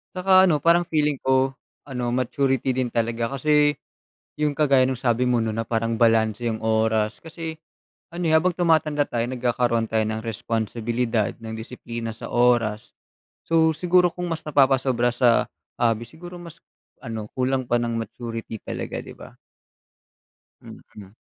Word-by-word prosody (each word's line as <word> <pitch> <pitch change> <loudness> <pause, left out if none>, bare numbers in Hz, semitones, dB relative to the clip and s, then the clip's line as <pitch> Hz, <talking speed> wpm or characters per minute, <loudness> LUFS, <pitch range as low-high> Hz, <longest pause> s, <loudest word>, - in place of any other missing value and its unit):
'Tsaka, 185 0 +5
ano, 155 -6 +3
parang 170 +1 +4
feeling 150 -3 0
ko, 130 0 +2 0.3
ano, 125 -2 -3
maturity 130 +1 0
din 125 -2 -1
talaga 115 +1 -1
kasi, 150 +1 +3 0.7
'yong 150 -2 0
kagaya 135 -4 +4
ng 130 - -1
sabi 125 0 +1
mo, 120 -2 +2
'no, 110 - -2
na 110 - -2
parang 115 0 -1
balanse 115 0 +2
'yong 110 -1 -4
oras, 110 -1 +1
kasi, 160 -1 -7 0.5
ano, 175 +1 -5
eh, - - +2
habang 175 +2 +1
tumatanda 155 -4 +2
tayo, 115 -1 -1
nagkakaroon 120 -2 0
tayo 110 - +1
ng 110 +1 -4
responsibilidad 115 0 -2
at - - -31 0.2
disiplina 115 0 -6
sa - - -8
oras. 120 -3 +1 0.5
So, 160 -1 +2
siguro 180 +2 +3
kung 175 +1 -5
mas 160 - -3
napapasobra 130 -4 +2
sa 120 -1 +3 0.3
hobby, 115 -1 0
siguro 175 +5 -11
mas, 170 -1 -12 0.4
ano, 110 -2 -5
kulang 130 -1 0
pa 120 - +2
ng 120 0 -2
maturity 115 0 -6
talaga, - - -5
'di - - -10
ba? - - -13 1.3
Mhm. 100 -2 -13
125 Hz, 150 wpm, -23 LUFS, 115-150 Hz, 1.3 s, Tsaka